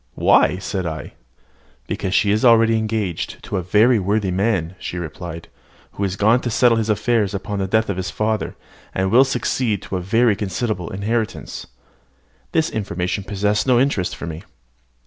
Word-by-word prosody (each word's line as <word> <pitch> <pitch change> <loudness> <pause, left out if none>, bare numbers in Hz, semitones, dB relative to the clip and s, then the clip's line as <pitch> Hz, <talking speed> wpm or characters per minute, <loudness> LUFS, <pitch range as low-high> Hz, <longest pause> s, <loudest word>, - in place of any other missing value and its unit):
"Why?" 90 - +4
said 95 -1 -3
I. 80 -1 -6 0.7
"Because 95 - -2
she 100 - +3
is 105 +1 +1
already 115 -2 +5
engaged 110 -5 -2
to 100 - -3
a - - 0
very 105 +6 +4
worthy 100 0 0
man," 95 -3 0
she 90 - -5
replied, 85 0 -7 0.4
"who 100 - -4
is 95 -1 -1
gone 110 +5 +3
to 120 - -2
settle 120 0 +3
his 110 0 -2
affairs 105 -1 +1
upon 100 +1 -4
the 95 - -1
death 110 +3 +2
of 100 - -2
his 95 0 -3
father, 110 +1 -2 0.4
and 95 0 0
will 125 +3 +7
succeed 125 -5 -1
to 95 - -3
a - - -3
very 115 +4 +3
considerable 100 -2 -3
inheritance." 110 +3 -3 0.8
This 160 0 +1
information 95 -1 -3
possessed 105 +3 0
no 125 -2 +5
interest 125 -9 0
for - - -7
me. 80 0 -6
105 Hz, 170 wpm, -20 LUFS, 95-115 Hz, 0.8 s, will